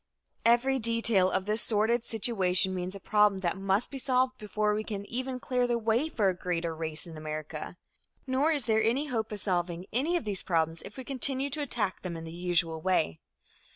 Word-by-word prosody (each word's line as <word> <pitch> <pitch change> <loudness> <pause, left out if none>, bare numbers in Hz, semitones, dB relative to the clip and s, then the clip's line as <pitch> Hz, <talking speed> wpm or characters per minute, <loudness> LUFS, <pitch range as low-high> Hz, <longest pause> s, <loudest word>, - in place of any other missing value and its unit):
Every 250 +3 +4
detail 230 -5 +3
of 190 - -1
this 215 +2 0
sordid 225 +2 +2
situation 195 -5 +2
means 185 +1 -4
a - - -7
problem 210 +1 +3
that 175 -2 0
must 195 +3 0
be 275 - -5
solved 255 0 +1
before 210 0 0
we 215 +1 -1
can 200 -2 -5
even 255 +3 -3
clear 250 -1 0
the 240 -1 +1
way 230 +7 +1
for 215 -9 +1
a 190 - +3
greater 170 -2 -2
race 160 -1 -4
in 165 -2 -9
America. 155 +2 -6 0.5
Nor 270 +4 +2
is 290 -7 +2
there 220 -1 +3
any 265 +7 +1
hope 225 -3 -2
of 210 - -4
solving 175 -2 -1
any 290 +9 +1
of - - -4
these 205 -3 -1
problems 165 -2 0
if 210 - -11
we 260 - -5
continue 270 +1 0
to 300 +2 -2
attack 220 -9 -2
them 175 -3 -5
in 165 - -7
the 165 - -7
usual 170 -2 0
way. 160 - +1
210 Hz, 205 wpm, -29 LUFS, 180-245 Hz, 0.5 s, Every